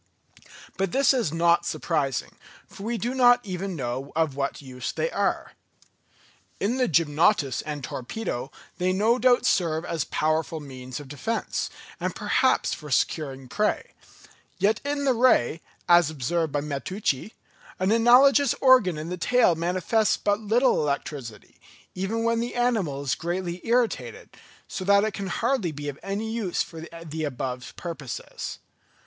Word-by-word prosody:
But 195 -2 0
this 275 +1 +4
is 240 - 0
not 170 +1 +3
surprising, 140 -7 -1 0.3
for - - -13
we 230 +3 -2
do 240 +3 -2
not 245 -1 +6
even 190 0 -4
know 130 0 -4
of 160 -4 +1
what 140 0 -2
use 130 -2 -5
they - - -2
are. - - -1 1.1
In 230 +6 0
the 255 - +2
gymnotus 155 - +2
and 150 -2 -6
torpedo 130 - -4 0.3
they 185 +1 +1
no 220 +6 +2
doubt 250 -1 +4
serve 165 -2 +1
as 165 -3 -2
powerful 155 +1 0
means 130 -3 -8
of 145 - -10
defence, 145 - -3 0.3
and - - -2
perhaps - - +2
for 150 - -8
securing 135 -1 -1
prey; 210 +10 -1 0.6
yet 215 +2 +2
in 285 0 -2
the 265 - +4
ray, 225 - +3 0.3
as 175 -3 +6
observed 155 +2 -1
by 145 - 0
Matteucci, 150 - -2 0.4
an 190 +2 +1
analogous 250 +4 +6
organ 250 - +5
in 155 +2 -5
the 180 - -4
tail 240 0 +3
manifests 180 +6 +1
but 205 0 0
little 225 +5 +2
electricity, 140 -5 -4 0.4
even 205 +5 -2
when 230 0 +1
the 235 +1 -3
animal 215 - 0
is 135 - 0
greatly 175 +1 -3
irritated; 235 0 0 0.4
so 190 - -5
little 200 +1 +5
that - - +2
it - - -13
can 195 -1 -4
hardly 230 -3 0
be 145 -1 -5
of 140 - -8
any 205 +3 -3
use 220 -6 -1
for 160 -1 -10 0.2
the 160 0 -4
above 125 -3 -4
purposes. 150 -8 -6
175 Hz, 155 wpm, -25 LUFS, 145-225 Hz, 1.1 s, not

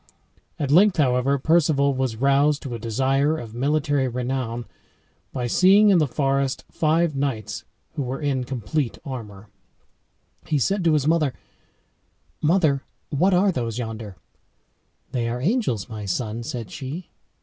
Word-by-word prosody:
At 140 -2 -2
length, 190 +5 +5
however, 135 -1 +2
Perceval 145 -2 +3
was 130 -3 -1
roused 140 +4 +2
to 130 - -5
a 115 - -4
desire 135 +7 +1
of 115 -6 -8
military 140 +1 +1
renown 125 -1 -3 0.7
by 125 -2 -3
seeing 195 - +5
in 190 -4 +5
the 155 - +2
forest 135 0 0
five 160 0 +1
knights 110 -9 -3 0.3
who 155 - -3
were 130 0 -3
in 140 -4 -1
complete 125 +1 -2
armor. 105 -7 -7 1.0
He 150 - +1
said 195 - +1
to 165 - +4
his 150 -3 +2
mother, 155 -4 +2 1.1
"Mother, 155 -4 +3 0.3
what 180 +6 +3
are 190 +2 +4
those 115 -7 -3
yonder?" 110 -4 -5 1.0
"They 120 -2 -1
are 120 +1 -3
angels, 155 - 0
my 110 -3 -7
son," 110 +4 -2
said 115 -2 -6
she. 150 +7 -7
135 Hz, 140 wpm, -23 LUFS, 120-155 Hz, 1.1 s, length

